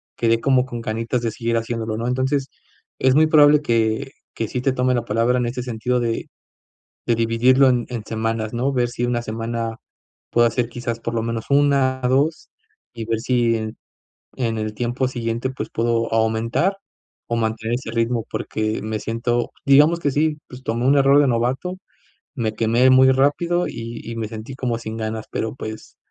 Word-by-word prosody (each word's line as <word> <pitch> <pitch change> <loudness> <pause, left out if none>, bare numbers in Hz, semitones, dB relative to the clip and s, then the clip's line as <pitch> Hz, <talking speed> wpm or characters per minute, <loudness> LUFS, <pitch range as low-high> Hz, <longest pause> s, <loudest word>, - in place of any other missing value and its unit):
quedé 115 0 +1
como 130 +1 +3
con 120 -3 -6
ganitas 115 +2 -2
de 115 - -1
seguir 115 +1 -1
haciéndolo, 115 -1 -3
¿no?, 115 +2 -3
entonces, 130 +2 0 0.5
es 130 0 +3
muy 155 +3 +5
probable 150 -1 +6
que 115 +1 0 0.2
que 115 - -3
sí 125 - -3
te 135 - +2
tome 125 0 +1
la 120 - -1
palabra 120 +2 +1
en 125 - 0
este 125 +1 -3
sentido 125 +1 -1
de 115 -1 -2 0.8
de 120 - +3
dividirlo 120 +4 +4
en 125 -2 +1
en 120 -3 -5
semanas, 110 0 -2
¿no?, 130 +4 0
ver 125 -2 +1
si 120 0 -3
1 120 -1 0
semana 115 0 -4 0.5
puedo 120 0 +4
hacer 120 0 0
quizás 120 -1 -4
por 115 0 -4
lo 115 - 0
menos 115 -1 -3
1 140 -2 +3
2, 145 +5 +1 0.4
y 115 -1 -5
ver 115 0 0
si 120 -2 +2
en 110 -1 -5 0.6
en 115 -3 -1
el 110 0 -3
tiempo 120 +3 -1
siguiente, 120 0 -2
pues, 130 - -6
puedo 115 0 0
o - - -5
aumentar 115 - +1 0.5
o 115 - -1
mantener 110 +1 -1
ese 120 -2 -5
ritmo, 115 0 0
porque 110 -1 -2
me 110 0 -3
siento, 120 +1 -1
digamos 150 +5 +5
que 145 - +1
sí, 150 +2 +1
pues, 125 +1 -10
tomé 115 +1 -1
un 140 +1 +5
error 140 +1 +5
de 145 - +3
novato, 130 +9 -1 0.6
me 110 -4 -1
quemé 115 +3 +3
muy 130 0 +6
rápido 170 +6 +2
y 115 0 -6
y 115 - -5
me 110 -2 -4
sentí 110 +3 -7
como 125 -3 -2
sin 110 -1 -6
ganas, 110 0 -4
pero, 110 -1 -2
pues, 110 -4 -8
120 Hz, 190 wpm, -21 LUFS, 115-130 Hz, 0.8 s, probable